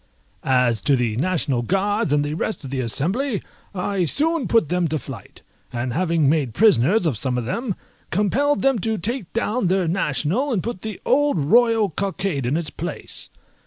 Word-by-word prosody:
As 125 Hz, -4 st, +2 dB
to 140 Hz, -, +3 dB
the 120 Hz, -4 st, 0 dB
National 145 Hz, -5 st, 0 dB
Guards 200 Hz, -, 0 dB
and 145 Hz, 0 st, +2 dB
the 145 Hz, -, -3 dB
rest 190 Hz, +3 st, -2 dB
of 135 Hz, -, -7 dB
the 135 Hz, -, -2 dB
Assembly, 190 Hz, -, 0 dB, 0.3 s
I 190 Hz, 0 st, 0 dB
soon 310 Hz, -, +1 dB
put 225 Hz, -10 st, +2 dB
them 180 Hz, -1 st, +1 dB
to 155 Hz, 0 st, -1 dB
flight; 135 Hz, -4 st, -10 dB, 0.3 s
and 120 Hz, 0 st, -3 dB
having 165 Hz, -2 st, +1 dB
made 140 Hz, -5 st, +1 dB
prisoners 200 Hz, -, +4 dB
of 135 Hz, -10 st, 0 dB
some 125 Hz, -1 st, -1 dB
of 120 Hz, -, -2 dB
them, 210 Hz, -, -2 dB, 0.3 s
compelled 265 Hz, +10 st, +1 dB
them 270 Hz, -4 st, +3 dB
to 220 Hz, +2 st, -1 dB
take 225 Hz, +1 st, -3 dB
down 230 Hz, -2 st, 0 dB
their 185 Hz, -1 st, +1 dB
national, 180 Hz, -, 0 dB
and 205 Hz, -7 st, 0 dB
put 235 Hz, -6 st, -4 dB
the 220 Hz, -3 st, -5 dB
old 290 Hz, -5 st, +3 dB
royal 225 Hz, +6 st, +3 dB
cockade 190 Hz, -6 st, -2 dB
in 140 Hz, +5 st, +1 dB
its 165 Hz, -2 st, -3 dB
place. -, -, -6 dB
180 Hz, 180 wpm, -22 LUFS, 140-220 Hz, 0.3 s, prisoners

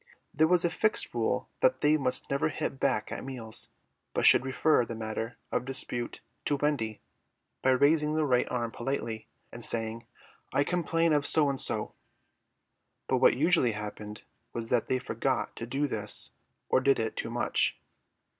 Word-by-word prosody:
There 160 Hz, -, +4 dB
was 175 Hz, 0 st, +3 dB
a 170 Hz, -, +1 dB
fixed 215 Hz, +4 st, +2 dB
rule -, -, -1 dB
that -, -, +2 dB
they 150 Hz, -, +4 dB
must 130 Hz, -3 st, +2 dB
never 140 Hz, +3 st, +1 dB
hit 135 Hz, -2 st, -4 dB
back 115 Hz, -6 st, 0 dB
at -, -, -5 dB
meals, 120 Hz, -5 st, -5 dB, 0.5 s
but -, -, +1 dB
should -, -, +7 dB
refer 135 Hz, +1 st, +2 dB
the 115 Hz, 0 st, -6 dB
matter 110 Hz, +1 st, -4 dB
of -, -, 0 dB
dispute 125 Hz, -2 st, -3 dB, 0.2 s
to 145 Hz, -, +2 dB
Wendy 135 Hz, -7 st, -1 dB, 0.6 s
by 130 Hz, -, +2 dB
raising 150 Hz, +3 st, +3 dB
the 155 Hz, -1 st, +2 dB
right 125 Hz, -3 st, +2 dB
arm 120 Hz, -2 st, -2 dB
politely 115 Hz, -4 st, -4 dB, 0.2 s
and 120 Hz, -, -9 dB
saying, 115 Hz, 0 st, 0 dB, 0.4 s
"I 140 Hz, -, +2 dB
complain 165 Hz, -1 st, +1 dB
of 145 Hz, -1 st, +2 dB
so 150 Hz, -3 st, +3 dB
and 135 Hz, -, -4 dB
so;" -, -, -2 dB, 1.1 s
but -, -, +2 dB
what -, -, +4 dB
usually 155 Hz, -6 st, +3 dB
happened 105 Hz, 0 st, -7 dB, 0.3 s
was 115 Hz, -1 st, -4 dB
that 120 Hz, -2 st, +1 dB
they 130 Hz, -, +1 dB
forgot 125 Hz, -, -2 dB
to 115 Hz, -, -5 dB
do 135 Hz, +4 st, 0 dB
this 105 Hz, -5 st, -1 dB, 0.4 s
or -, -, +3 dB
did 135 Hz, +1 st, +3 dB
it 110 Hz, -1 st, -2 dB
too -, -, -3 dB
much. 120 Hz, 0 st, 0 dB
130 Hz, 170 wpm, -29 LUFS, 115-150 Hz, 1.1 s, should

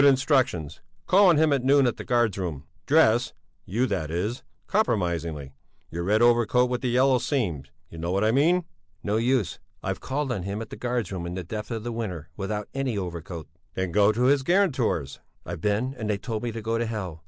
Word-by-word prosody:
Instructions: 130 Hz, -, +2 dB, 0.2 s
Call 195 Hz, 0 st, +6 dB
on 165 Hz, -, +5 dB
him 155 Hz, -1 st, +4 dB
at 135 Hz, -3 st, 0 dB
noon 140 Hz, +1 st, +5 dB
at 120 Hz, -, 0 dB
the -, -, -6 dB
guards 120 Hz, -5 st, +2 dB
room. 85 Hz, -8 st, -4 dB, 0.2 s
Dress 125 Hz, -6 st, +4 dB, 0.3 s
you 115 Hz, +7 st, 0 dB
that 95 Hz, -10 st, -2 dB
is 105 Hz, -, -2 dB, 0.2 s
compromisingly. 85 Hz, -, -1 dB, 0.4 s
Your 85 Hz, -, -3 dB
red 105 Hz, +5 st, +3 dB
overcoat 120 Hz, +1 st, +3 dB
with 125 Hz, -, -1 dB
the 130 Hz, -, 0 dB
yellow 130 Hz, +1 st, +4 dB
seams, 85 Hz, -, -2 dB, 0.2 s
you 80 Hz, -, -11 dB
know 85 Hz, +1 st, -3 dB
what 100 Hz, +2 st, +1 dB
I 110 Hz, -, +3 dB
mean." 165 Hz, +7 st, +3 dB, 0.4 s
"No 105 Hz, +1 st, 0 dB
use! 120 Hz, -4 st, +1 dB, 0.2 s
I've -, -, -2 dB
called 135 Hz, 0 st, -2 dB
on 105 Hz, -6 st, -2 dB
him 100 Hz, +3 st, -4 dB
at 115 Hz, -, -7 dB
the -, -, -5 dB
guards 120 Hz, -5 st, -2 dB
room 90 Hz, -3 st, -4 dB
in 90 Hz, -, -5 dB
the 95 Hz, -, -4 dB
depth 105 Hz, +5 st, -6 dB
of 115 Hz, -2 st, -4 dB
the 120 Hz, -, -3 dB
winter 90 Hz, -9 st, -5 dB
without 105 Hz, +1 st, -3 dB
any 135 Hz, -5 st, -1 dB
overcoat." 85 Hz, -3 st, -5 dB, 0.3 s
"Then 95 Hz, -1 st, -2 dB
go 100 Hz, +2 st, +4 dB
to 115 Hz, +3 st, -1 dB
his 135 Hz, +2 st, +4 dB
guarantors!" 135 Hz, -, +1 dB, 0.3 s
"I've -, -, -6 dB
been 105 Hz, +7 st, 0 dB
and 110 Hz, -1 st, -3 dB
they 105 Hz, -, +1 dB
told 110 Hz, +1 st, -4 dB
me 120 Hz, -, -2 dB
to 115 Hz, -1 st, -6 dB
go 115 Hz, +1 st, 0 dB
to 120 Hz, -, -1 dB
hell. 95 Hz, -8 st, -5 dB
110 Hz, 210 wpm, -26 LUFS, 95-130 Hz, 0.4 s, Call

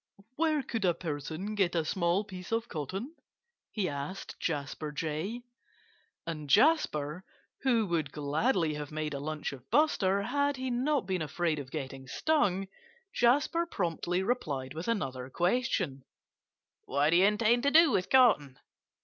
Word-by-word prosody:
"Where 310 Hz, -2 st, +1 dB
could 225 Hz, -3 st, -3 dB
a 175 Hz, -3 st, +3 dB
person 160 Hz, +5 st, -4 dB
get 190 Hz, -5 st, +1 dB
a 165 Hz, -2 st, +1 dB
small 175 Hz, +3 st, +1 dB
piece 185 Hz, -2 st, -9 dB
of 230 Hz, +1 st, 0 dB
cotton?" 195 Hz, -, -5 dB, 0.6 s
he 205 Hz, -4 st, -1 dB
asked 145 Hz, +5 st, -6 dB
Jasper 150 Hz, -1 st, -3 dB
Jay. 165 Hz, +10 st, -3 dB, 0.8 s
And 155 Hz, -3 st, -5 dB
Jasper 185 Hz, -, +3 dB, 0.4 s
who 240 Hz, -5 st, +2 dB
would 165 Hz, -6 st, -1 dB
gladly 155 Hz, -, 0 dB
have 150 Hz, -1 st, -6 dB
made 155 Hz, -1 st, -3 dB
a 140 Hz, -, -3 dB
lunch 155 Hz, 0 st, -4 dB
of 130 Hz, -1 st, -12 dB
Buster, 200 Hz, -10 st, +3 dB
had 285 Hz, +4 st, 0 dB
he 260 Hz, 0 st, -3 dB
not 260 Hz, 0 st, +1 dB
been 185 Hz, -2 st, -1 dB
afraid 155 Hz, +1 st, -1 dB
of 135 Hz, -2 st, -7 dB
getting 135 Hz, -3 st, -6 dB
stung 195 Hz, -, +1 dB, 0.5 s
Jasper 290 Hz, +8 st, +2 dB
promptly 175 Hz, -, -1 dB
replied 145 Hz, -, -2 dB
with 160 Hz, +3 st, -6 dB
another 130 Hz, -, -2 dB
question: 175 Hz, -, 0 dB, 0.8 s
"What 145 Hz, +3 st, +2 dB
do 170 Hz, -, +5 dB
you 185 Hz, -, +6 dB
intend 215 Hz, +3 st, +3 dB
to 280 Hz, -, +3 dB
do 320 Hz, 0 st, +6 dB
with 180 Hz, -, 0 dB
cotton?" 205 Hz, -, +4 dB
180 Hz, 150 wpm, -30 LUFS, 150-235 Hz, 0.8 s, you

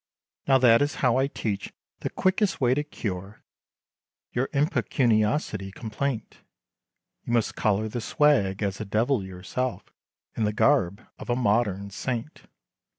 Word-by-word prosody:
"Now 135 Hz, -1 st, +6 dB
that 120 Hz, -2 st, +6 dB
is 145 Hz, 0 st, 0 dB
how 125 Hz, 0 st, +4 dB
I 135 Hz, +1 st, +2 dB
teach, 105 Hz, -7 st, -4 dB, 0.3 s
the -, -, -3 dB
quickest 185 Hz, -2 st, +1 dB
way 125 Hz, -1 st, +3 dB
to 145 Hz, +3 st, 0 dB
cure, 100 Hz, -8 st, -6 dB, 0.9 s
Your 125 Hz, +2 st, -1 dB
impecuniosity 115 Hz, -, +1 dB
complaint, 115 Hz, +4 st, -4 dB, 0.8 s
You 120 Hz, -, -3 dB
must 115 Hz, -2 st, +2 dB
collar 105 Hz, +1 st, +1 dB
the 115 Hz, +2 st, -4 dB
swag, 110 Hz, -9 st, +2 dB
as 100 Hz, +1 st, -2 dB
a -, -, -3 dB
Devil 110 Hz, +3 st, +1 dB
yourself, 95 Hz, +7 st, -4 dB, 0.4 s
In 110 Hz, -, -1 dB
the 105 Hz, 0 st, +1 dB
garb, 105 Hz, -6 st, +2 dB
of -, -, -9 dB
a 120 Hz, -, +2 dB
modern 105 Hz, -4 st, +1 dB
saint. 120 Hz, +7 st, -5 dB
115 Hz, 140 wpm, -26 LUFS, 100-135 Hz, 0.9 s, Now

